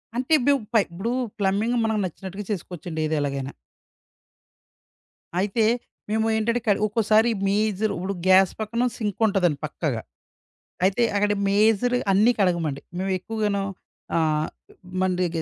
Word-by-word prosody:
అంటే 255 +5 -3
ఇబ్బు 280 +3 +3 0.2
పై 220 - +6
ఇప్పుడు 195 +8 -4 0.3
ప్లంబింగ్ 205 +5 +1
మనకు 220 -1 0
నచ్చినట్టుగా 190 +3 -7
చేసుకోవచ్చండి 175 -4 -5
ఏదెలాగైనా. 140 -3 -2 1.9
అయితే 205 +4 +1 0.5
మేము 220 +1 +1
ఏంటంటే 230 +2 +1
కడి 205 - +3
ఒక్కోసారి 220 +1 +3 0.2
మేజరు 210 +1 +1
ఇప్పుడు 190 +3 -3
గ్యాస్ 190 0 +6
పక్కన 225 +3 -1 0.2
సింకుంటాదండి 195 -6 +1
పక్కాగా. 145 -6 -3 0.8
అయితే 195 +5 +2
అక్కడ 205 0 +2 0.2
మేజరు 220 +4 +3
అన్నీ 215 +5 +5
కడగమండి. 170 -7 +1 0.2
మేము 190 +1 -1
ఎక్కువగాను 210 -1 -1 0.5
ఆహ్, 155 -2 +1 0.5
మన్‌ 185 0 +2
డెగే 170 -2 0
200 Hz, 115 wpm, -24 LUFS, 175-220 Hz, 1.9 s, పై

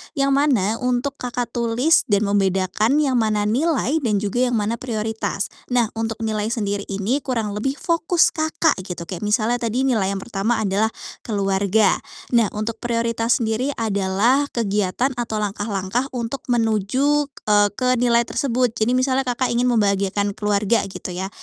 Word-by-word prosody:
yang 275 -1 +1
mana 250 -7 +2
untuk 250 +2 -1
Kakak 245 -1 -3
tulis, 240 +7 +2
dan 205 -1 +2
membedakan 200 +3 +1
yang 260 -4 +2
mana 215 -2 +1
nilai, 280 +6 +1
dan 230 -8 0
juga 245 +5 +1
yang 245 - 0
mana 220 +2 -1
prioritas. 220 -4 -3 0.2
Nah, 240 -3 +1
untuk 225 0 -4
nilai 215 -1 -1
sendiri 205 -3 -2
ini 200 +7 -1
kurang 230 -7 -2
lebih 220 +7 -2
fokus 335 +2 +2
Kakak, 315 - +1
gitu. 175 -2 -5
Kayak 185 +3 -5
misalnya 220 +3 +1
tadi 235 +3 -1
nilai 230 -8 +1
yang 195 0 -3
pertama 225 +1 -1
adalah 200 +2 +1 0.3
keluarga. 200 0 +1 0.3
Nah, 235 -3 +4
untuk 220 +1 -3
prioritas 230 0 0
sendiri 240 +6 -1
adalah 220 +6 +1
kegiatan 210 +3 0
atau 235 -2 -2
langkah-langkah 205 +2 -2
untuk 245 +5 -4
menuju, 245 +5 +1 0.2
eee, 205 -1 +4
ke 255 +2 +1
nilai 235 -1 +3
tersebut. 250 -1 0
Jadi, 230 +2 0
misalnya 260 0 +1
Kakak 250 +1 0
ingin 240 +1 +1
membahagiakan 200 -1 +1
keluarga 210 +1 0
gitu 190 -1 -7
ya. 185 +2 -4
225 Hz, 155 wpm, -21 LUFS, 205-250 Hz, 0.3 s, Nah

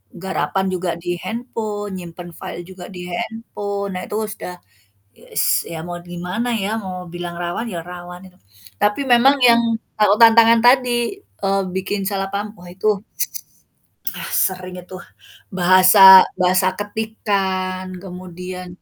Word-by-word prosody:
garapan 190 +1 -2
juga 180 -1 -2
di 175 +1 -3
handphone, 210 -1 -4
nyimpen 175 0 -9
file 175 - -7
juga 185 -1 -10
di 180 -1 -8
handphone, 205 -2 -4
nah 180 - -3
itu - - -5 0.2
sudah 180 - -8 0.6
ye - - -18
s - - +2
ya 160 -1 -6
mau 175 0 -5
gimana 180 +6 -4 0.2
ya 200 - -1
mau 185 -3 -6
bilang 175 0 -5
rawan 175 +7 -3
ya 170 - -4
rawan 180 +1 -9
itu. 180 - -28 0.4
Tapi 210 +6 +2
memang 265 +4 +6
yang 235 -1 +7 0.4
tahu 210 -1 +5
tantangan 230 0 +7
tadi, 245 +6 +3
eee, 195 - -2
bikin 195 +2 -2
salah 195 -1 -2
paham 205 +1 -4
wah 175 - -12
itu 200 +2 0 1.2
ah - - -5 0.2
sering 185 -1 -6
itu 185 - -12 0.6
bahasa 185 +2 +6 0.4
bahasa 185 +1 +3
ketikan 195 -3 -2 0.2
kemudian 180 0 -8
190 Hz, 135 wpm, -20 LUFS, 180-210 Hz, 1.2 s, yang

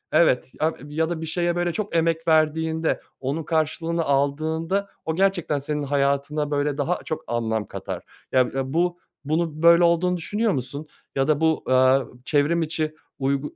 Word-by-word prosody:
Evet, 145 -8 +4
ya 160 +1 +2
ya 160 +3 -1
da 165 -2 -3
bir - - -3
şeye, 175 +1 0
böyle, 175 -1 0
çok 205 -2 -3
emek 165 0 +1
verdiğinde, 160 0 +2 0.2
onun 140 +5 -2
karşılığını 165 +1 0
aldığında 160 +7 0 0.2
o 160 - -1
gerçekten 180 -6 +1
senin 150 +1 -3
hayatına, 140 +1 0
böyle, 145 0 0
daha 160 +5 0
çok 155 - -4
anlam 110 -3 -1
katar. - - -6 0.3
Ya 130 - +4 0.2
ya 135 +1 -2
bu 175 +1 +1 0.3
bunun 155 +1 -1
böyle 170 +1 +7
olduğunu 175 +1 +3
düşünüyor 210 +6 0
musun? 140 +3 -4 0.3
Ya 135 0 +1
da 155 0 +2
bu, 160 -1 +2
aaa, 130 +1 +4 0.2
çevrim 155 +4 +2
içi 155 0 -2 0.2
uygu 140 +2 -1
155 Hz, 165 wpm, -24 LUFS, 140-170 Hz, 0.3 s, böyle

